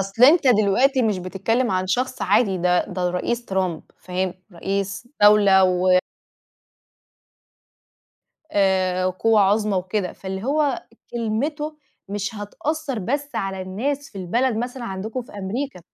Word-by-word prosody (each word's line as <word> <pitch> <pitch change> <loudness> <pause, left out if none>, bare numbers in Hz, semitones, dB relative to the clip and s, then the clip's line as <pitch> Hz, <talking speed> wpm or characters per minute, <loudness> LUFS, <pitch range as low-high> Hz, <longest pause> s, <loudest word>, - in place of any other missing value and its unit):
أصل 195 +5 +3
أنت 305 +2 +6
دلوقتي 250 +4 +4
مش 215 -4 +1
بتتكلم 200 +7 -1
عن 185 0 0
شخص 255 +6 -1
عادي 195 -6 +2
ده 180 0 +2
ده 180 -1 -1
الرئيس 235 +7 -2
ترامب 185 -6 -1
فاهم؟ 185 0 -3 0.2
رئيس 195 +4 -3
دولة 205 -2 +7
و 185 0 +4 2.5
آآ 185 -2 +2
قوة 210 +4 +2
عظمى 205 +1 +2
وكده، 185 0 -2
فاللي 190 +1 -6
هو 285 0 +1 0.3
كلمته 285 +7 -2 0.3
مش 200 +1 -3
هتأثر 275 +6 -3
بس 280 +8 -2
على 195 -1 -2
الناس 270 +10 -3
في 200 - -9
البلد 230 +7 0
مثلًا 245 +2 -4
عندكم 215 +5 -4
في 240 - -16
أمريكا 205 +4 -4
205 Hz, 130 wpm, -22 LUFS, 190-245 Hz, 2.5 s, دولة